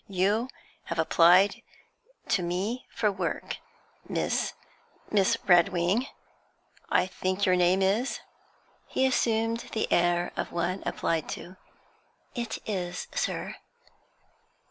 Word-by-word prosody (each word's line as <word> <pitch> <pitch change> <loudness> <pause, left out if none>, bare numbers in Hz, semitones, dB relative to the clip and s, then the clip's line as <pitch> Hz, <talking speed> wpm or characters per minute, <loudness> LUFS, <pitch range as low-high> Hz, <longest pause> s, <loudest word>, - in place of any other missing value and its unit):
You 200 +5 +1 0.4
have 170 - -4
applied 175 +4 +5 0.7
to 195 - +2
me 190 +8 -2
for 215 -3 +1
work, 185 -4 -3 0.5
Miss - - 0 0.6
Miss 195 -3 +3
Redwing, 180 +5 +3 0.8
I - - +3
think 185 +1 -1
your 185 -1 +4
name 180 +2 +3
is?' 215 +8 +1 0.7
He 265 - +1
assumed 230 -3 +1
the 220 - -1
air 175 0 +2
of - - -3
one 175 +3 -1
applied 165 -2 -1
to. 185 - -11 0.8
'It 235 -2 -3
is, 180 -4 -3
sir.' - - -2
185 Hz, 105 wpm, -28 LUFS, 175-220 Hz, 0.8 s, applied